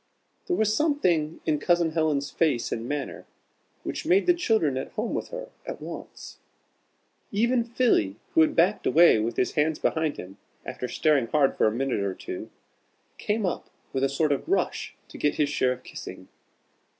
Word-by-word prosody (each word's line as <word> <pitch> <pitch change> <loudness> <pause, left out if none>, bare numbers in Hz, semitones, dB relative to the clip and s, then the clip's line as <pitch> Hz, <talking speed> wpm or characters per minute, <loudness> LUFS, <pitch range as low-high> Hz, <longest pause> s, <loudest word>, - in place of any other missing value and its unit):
There 360 - +1
was 215 0 +2
something 180 - +1
in 150 -2 +1
Cousin 170 +1 +2
Helen's 150 -4 0
face 145 -8 +1
and 115 +1 -3
manner, 145 -1 -4 0.6
which - - -4
made 360 +5 +3
the 355 - +5
children 220 - +1
at 130 - -3
home 220 +2 -2
with - - -2
her - - -7
at - - -6
once. - - -9 0.9
Even 235 +4 +2
Philly, 230 - +1 0.2
who - - +5
had 155 - +3
backed 180 +5 +2
away 165 -8 +6
with 115 +2 -2
his 125 - +1
hands 150 0 +1
behind 160 -2 0
him, 95 +2 -10 0.3
after 125 - -5
staring 145 -3 +2
hard 140 +1 +2
for - - +3
a - - +2
minute 130 +1 -1
or 100 -2 -2
two, - - -7 0.7
came 210 0 -1
up 180 - -3 0.2
with 135 - 0
a 135 - +3
sort 150 +2 +1
of 145 - -2
rush 390 - -1
to - - -11
get 145 - +1
his 145 -1 +1
share 130 -3 +1
of 125 0 -13
kissing. - - -9
155 Hz, 180 wpm, -26 LUFS, 135-215 Hz, 0.9 s, away